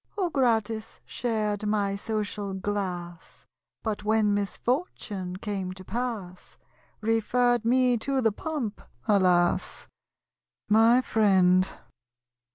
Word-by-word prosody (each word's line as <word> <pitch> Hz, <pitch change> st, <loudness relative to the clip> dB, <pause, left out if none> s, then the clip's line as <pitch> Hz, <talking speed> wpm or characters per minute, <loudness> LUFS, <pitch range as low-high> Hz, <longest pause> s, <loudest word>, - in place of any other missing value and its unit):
Who, 365 Hz, -4 st, 0 dB
gratis, 225 Hz, -5 st, 0 dB
shared, 215 Hz, -3 st, -2 dB
my 205 Hz, -2 st, +1 dB
social 205 Hz, -1 st, -3 dB
glass, 185 Hz, -4 st, -5 dB, 0.4 s
But 215 Hz, -2 st, -2 dB
when 215 Hz, -1 st, +2 dB
misfortune 205 Hz, -, -2 dB
came 190 Hz, -2 st, -4 dB
to 185 Hz, 0 st, -11 dB
pass, 215 Hz, -6 st, -5 dB, 0.4 s
Referr'd 235 Hz, +2 st, +2 dB
me 250 Hz, 0 st, +3 dB
to 270 Hz, +3 st, 0 dB
the 225 Hz, -4 st, +3 dB
pump? 255 Hz, -2 st, -4 dB, 0.3 s
Alas! 180 Hz, -4 st, +2 dB, 0.8 s
My 225 Hz, +4 st, +5 dB
Friend. 190 Hz, -5 st, +3 dB
210 Hz, 95 wpm, -27 LUFS, 195-235 Hz, 0.8 s, My